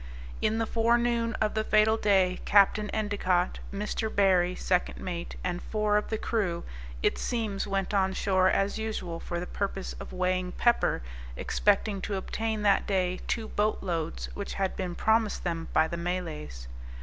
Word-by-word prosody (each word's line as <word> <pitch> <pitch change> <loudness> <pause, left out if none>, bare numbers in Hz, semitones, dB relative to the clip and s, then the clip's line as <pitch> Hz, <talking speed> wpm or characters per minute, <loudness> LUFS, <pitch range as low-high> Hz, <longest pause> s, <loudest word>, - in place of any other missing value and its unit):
In 215 +1 +1
the 225 - +1
forenoon 235 +1 +2
of 215 -1 0
the 220 - 0
fatal 215 0 +4
day, 190 -4 +2
Capt. 200 +1 +5
Endicott, 200 -4 0
Mr. 210 +2 -2
Barry, 185 -2 +4
second 180 -1 0
mate, 175 -2 -5
and 180 -1 -2
four 210 -1 0
of 210 - +1
the 220 - -1
crew, 195 -7 -1 0.4
it - - +2
seems 220 -5 -2
went 195 0 -1
on 190 -1 +2
shore 190 -1 +3
as 195 +3 +1
usual, 200 -6 -3
for 175 0 -4
the 180 - -4
purpose 195 0 -3
of - - -8
weighing 185 0 -1
pepper, 240 - +2 0.3
expecting 205 -1 +1
to 200 - -3
obtain 220 +3 -2
that 200 -2 +3
day 185 -2 0
two 225 -2 -1
boat 210 +1 0
loads, 160 - -2
which - - -5
had 195 -1 -1
been 180 -2 -3
promised 220 +1 +1
them 165 -2 -2
by 160 - +4
the 170 - -4
Malays. 75 - -4
195 Hz, 165 wpm, -28 LUFS, 180-215 Hz, 0.4 s, Capt